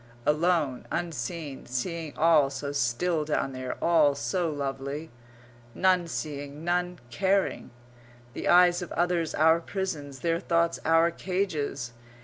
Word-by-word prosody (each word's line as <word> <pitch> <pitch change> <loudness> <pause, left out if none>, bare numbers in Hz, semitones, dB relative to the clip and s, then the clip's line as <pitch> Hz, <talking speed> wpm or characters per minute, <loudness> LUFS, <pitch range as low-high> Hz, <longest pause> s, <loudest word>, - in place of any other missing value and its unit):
Alone, 150 -4 +1
unseen; 155 -2 -4
seeing 155 +5 -4
all 155 -3 +5
so 140 +1 -4
still 145 +5 0
down 150 -3 -1
there, 130 0 -5
all 155 -4 +4
so 175 +4 -1
lovely. 140 +1 -4 0.6
None 185 -2 +3
seeing, 145 -2 -5
none 180 +1 0
caring. 195 +6 0 0.6
The - - -4
eyes 175 0 +6
of 175 - -6
others 175 -2 0
our 160 +2 +5
prisons; 165 -7 -5
their 165 0 +1
thoughts 170 -1 +1
our 165 +1 +4
cages. 155 -10 -2
160 Hz, 125 wpm, -27 LUFS, 140-175 Hz, 0.6 s, eyes